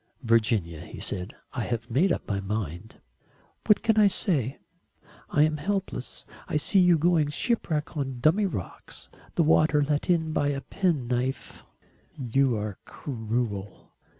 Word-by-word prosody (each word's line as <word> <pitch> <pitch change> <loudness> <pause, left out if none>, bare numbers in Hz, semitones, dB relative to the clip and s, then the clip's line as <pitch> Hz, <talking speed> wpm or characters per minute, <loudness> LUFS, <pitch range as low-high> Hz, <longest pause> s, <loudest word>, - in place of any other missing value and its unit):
"Virginia," 110 -8 +1
he - - -10
said, 95 0 -4 0.2
"I 125 - -2
have 115 0 -3
made 170 +10 +3
up - - -2
my 100 -2 -1
mind." 100 -1 -5 0.7
"What 210 - +4
can 225 -1 +3
I 210 - +7
say? 150 - 0 0.7
I 145 - +4
am 155 0 +1
helpless. 190 -4 -4 0.2
I - - 0
see 190 +6 +3
you 180 -2 +5
going 160 -2 +3
shipwreck 155 - -1
on 135 -4 -3
dummy 175 +10 +3
rocks 100 - -7 0.3
the 170 - +3
water 155 -1 +4
let 145 +3 -1
in 160 -3 +2
by 145 - +1
a 140 -1 -1
penknife." 130 -9 -2 0.5
"You 130 -1 +1
are 105 -2 -4
cruel." 110 -5 -4
140 Hz, 145 wpm, -27 LUFS, 115-160 Hz, 0.7 s, I